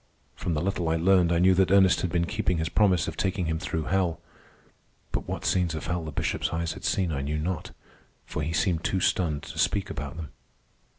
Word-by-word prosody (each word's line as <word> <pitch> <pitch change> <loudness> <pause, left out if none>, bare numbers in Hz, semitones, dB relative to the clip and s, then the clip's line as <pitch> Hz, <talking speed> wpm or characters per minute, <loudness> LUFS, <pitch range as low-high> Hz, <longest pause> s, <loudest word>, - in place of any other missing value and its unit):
From 85 - -2
the 75 - -1
little 90 -3 -1
I 80 - +2
learned 90 0 +4
I 85 - +3
knew 95 +2 +5
that 95 0 +3
Ernest 95 -1 +5
had 90 - -1
been 85 0 +1
keeping 95 -3 -1
his 80 0 -1
promise 95 -5 +3
of - - -4
taking 95 -1 -1
him 80 0 -1
through 80 -2 -2
hell. 90 -1 0 0.9
But - - -3
what - - -4
scenes 90 -3 +1
of 80 - -5
hell 90 -1 -2
the 80 - -5
Bishop's - - -1
eyes 80 0 -2
had - - -11
seen, 90 -4 +1
I 70 -3 -2
knew 75 +3 -2
not, 80 +1 -3 0.6
for - - -4
he 80 +2 -2
seemed 85 0 +1
too 95 - 0
stunned 80 -5 0
to - - -8
speak 100 -1 +1
about 70 -2 -5
them. 80 -2 -6
85 Hz, 225 wpm, -27 LUFS, 80-95 Hz, 0.9 s, knew